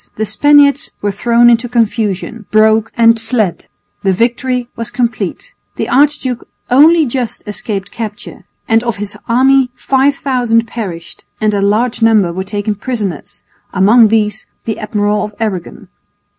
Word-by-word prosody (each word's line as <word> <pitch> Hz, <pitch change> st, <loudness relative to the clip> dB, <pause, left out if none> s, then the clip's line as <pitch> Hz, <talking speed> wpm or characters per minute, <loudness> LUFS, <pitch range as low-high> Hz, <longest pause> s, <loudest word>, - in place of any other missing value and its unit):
The 220 Hz, -, -2 dB
Spaniards 290 Hz, +6 st, +3 dB
were 205 Hz, -, 0 dB
thrown 235 Hz, +4 st, +3 dB
into 240 Hz, 0 st, +3 dB
confusion, 220 Hz, -2 st, -1 dB
broke 220 Hz, +1 st, +3 dB
and 230 Hz, -1 st, +4 dB
fled. 225 Hz, -5 st, -2 dB, 0.3 s
The 195 Hz, -, +1 dB
victory 240 Hz, +4 st, -1 dB
was 230 Hz, -1 st, -4 dB
complete. 245 Hz, -, -3 dB, 0.2 s
The -, -, -3 dB
archduke 270 Hz, -3 st, +1 dB, 0.2 s
only 310 Hz, +5 st, +5 dB
just 245 Hz, -2 st, -4 dB
escaped 205 Hz, -2 st, -5 dB
capture, 215 Hz, -3 st, -7 dB, 0.2 s
and 225 Hz, 0 st, +3 dB
of 235 Hz, -2 st, -2 dB
his 205 Hz, 0 st, -5 dB
army 260 Hz, +2 st, +3 dB
5000 260 Hz, -4 st, +1 dB
perished 185 Hz, -8 st, -7 dB, 0.2 s
and 215 Hz, -1 st, +1 dB
a 200 Hz, -, 0 dB
large 225 Hz, +5 st, 0 dB
number 215 Hz, -6 st, +3 dB
were 190 Hz, +2 st, -3 dB
taken 205 Hz, +2 st, -3 dB
prisoners, 205 Hz, -, -5 dB, 0.3 s
among 215 Hz, +5 st, +5 dB
these 215 Hz, -1 st, 0 dB, 0.2 s
the 220 Hz, -, -3 dB
Admiral 210 Hz, -1 st, -1 dB
of 210 Hz, -1 st, -7 dB
Aragon. 200 Hz, -6 st, -4 dB
225 Hz, 140 wpm, -14 LUFS, 210-245 Hz, 0.3 s, only